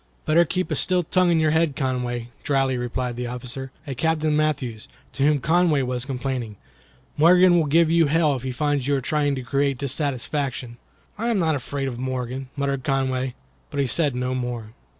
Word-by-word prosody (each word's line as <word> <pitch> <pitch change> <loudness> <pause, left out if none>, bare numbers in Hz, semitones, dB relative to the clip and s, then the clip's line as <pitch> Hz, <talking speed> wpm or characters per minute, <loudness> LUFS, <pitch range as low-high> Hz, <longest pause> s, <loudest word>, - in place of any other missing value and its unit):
"Better 170 +3 +4
keep 185 +3 -2
a - - +1
still 180 -1 +2
tongue 180 +2 +2
in 165 -1 +3
your 155 -1 +3
head, 160 -2 +2
Conway," 125 -3 -2
dryly 135 -2 +1
replied 125 0 -3
the 125 0 -3
officer, 125 +2 -6
a 140 - -4
Captain 155 +2 +1
Matthews, 140 -8 -1 0.3
to 135 - -5
whom 145 +1 +4
Conway 160 -1 +2
was 125 -1 -2
complaining. 125 -4 -3 0.6
"Morgan 180 +3 +6
will 155 - +1
give 165 +2 +4
you 165 -2 +4
hell 155 -1 +2
if 130 - -5
he 130 +1 -3
finds 145 0 0
you 145 - +2
are - - +1
trying 145 +1 0
to 130 - -5
create 140 +1 0
dissatisfaction." 135 -2 -3 0.4
"I 230 - -1
am 235 -3 +2
not 165 -4 +2
afraid 140 +1 -3
of 120 -2 -5
Morgan," 130 0 -4
muttered 140 -2 -1
Conway, 130 -2 -1 0.3
but 145 - -4
he 140 - +2
said 145 0 +1
no 125 +1 -1
more. 120 -3 -4
140 Hz, 190 wpm, -23 LUFS, 125-155 Hz, 0.6 s, Morgan